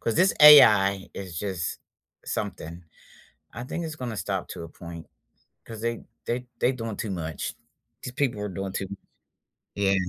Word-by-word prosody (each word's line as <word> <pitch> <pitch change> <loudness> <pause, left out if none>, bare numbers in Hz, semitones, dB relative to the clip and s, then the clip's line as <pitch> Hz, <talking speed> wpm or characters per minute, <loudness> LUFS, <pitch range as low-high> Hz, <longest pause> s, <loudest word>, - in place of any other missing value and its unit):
'Cause 115 - -1
this 185 +2 +4
AI 100 -10 +8
is 90 -4 -6
just 95 -5 -3 0.5
something. 85 +2 -5 0.7
I 120 +3 -6
think 170 +5 -4
it's 155 -1 -6
gonna 120 -5 -5
stop - - -3
to - - -7
a 85 - -8
point 85 0 -10 0.6
'cause 110 -2 -9
they 115 0 -3 0.2
they 125 +1 -2
they 125 - +3
doing 115 -4 -5
too 105 - -4
much. 80 -4 -4 0.5
These 125 - -6
people 125 -6 -1
are 105 - -3
doing 95 +1 -4
too 95 - -3
much. 100 0 -8 0.8
Yeah. 100 -1 +2
105 Hz, 165 wpm, -26 LUFS, 95-120 Hz, 0.8 s, AI